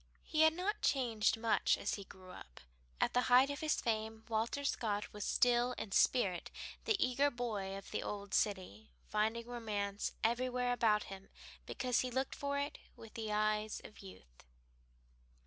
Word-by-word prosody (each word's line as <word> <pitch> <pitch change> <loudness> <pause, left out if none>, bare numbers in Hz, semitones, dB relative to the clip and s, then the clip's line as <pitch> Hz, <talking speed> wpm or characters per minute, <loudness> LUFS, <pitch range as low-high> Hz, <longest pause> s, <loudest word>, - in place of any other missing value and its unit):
He 310 -1 0
had 315 0 +6
not 370 +5 -2
changed 225 -5 +2
much 225 0 +2
as - - -2
he 200 - -4
grew 185 -1 -13
up. - - -12 0.4
At - - +1
the 250 - +4
height 255 +3 +6
of 285 - -5
his 310 -2 +1
fame 220 -1 -2
Walter 230 +5 -1
Scott 210 -6 -1
was 210 -1 -5
still 245 0 +3
in 205 - -6
spirit 190 -5 +2 0.4
the 440 - +3
eager 275 -1 +2
boy 215 -7 -3
of 195 - -11
the - - -1
old 200 -1 -5
city, 205 +1 -1 0.2
finding 220 +2 0
romance 210 -4 -3
everywhere 245 +1 +1
about 215 -3 +3
him 195 0 -10 0.4
because 250 -2 0
he 255 - 0
looked 260 +2 -1
for 280 0 -2
it 285 +1 -3 0.2
with 225 - -13
the 220 -2 -4
eyes 215 0 0
of - - -12
youth. 90 -11 -14
225 Hz, 165 wpm, -36 LUFS, 210-250 Hz, 0.4 s, had